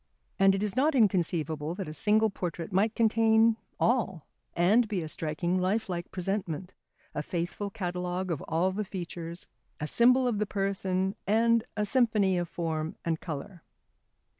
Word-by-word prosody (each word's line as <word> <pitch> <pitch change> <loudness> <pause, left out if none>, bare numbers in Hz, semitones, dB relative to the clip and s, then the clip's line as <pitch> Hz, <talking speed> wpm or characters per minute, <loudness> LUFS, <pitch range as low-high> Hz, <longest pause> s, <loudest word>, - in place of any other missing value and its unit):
And 195 0 +5
it 195 - -2
is 210 -1 -2
not 285 +4 +3
inconceivable 165 - +1
that 190 -3 -5
a 155 - -6
single 215 +5 +3
portrait 175 -2 -5
might 210 +4 +2
contain 225 0 +4 0.2
all 200 - +1 0.3
and 210 +7 +4
be 195 -5 -2
a - - -5
striking 165 +4 -1
lifelike 185 -2 -1
presentment, 185 -1 -3 0.4
a 150 - -2
faithful 175 +6 -3
catalogue 180 -2 -3
of 160 - -2
all 175 +4 +1
the 210 +3 -2
features, 175 -3 -6 0.3
a 150 - -2
symbol 250 +9 +4
of 225 -4 0
the 210 - 0
person 195 -1 -1
and 230 +2 +3
a 210 - +1
symphony 215 -5 +3
of 175 -1 -3
form 160 -2 -3
and 165 -1 0
colour. 165 +3 -6
190 Hz, 155 wpm, -29 LUFS, 170-215 Hz, 0.4 s, And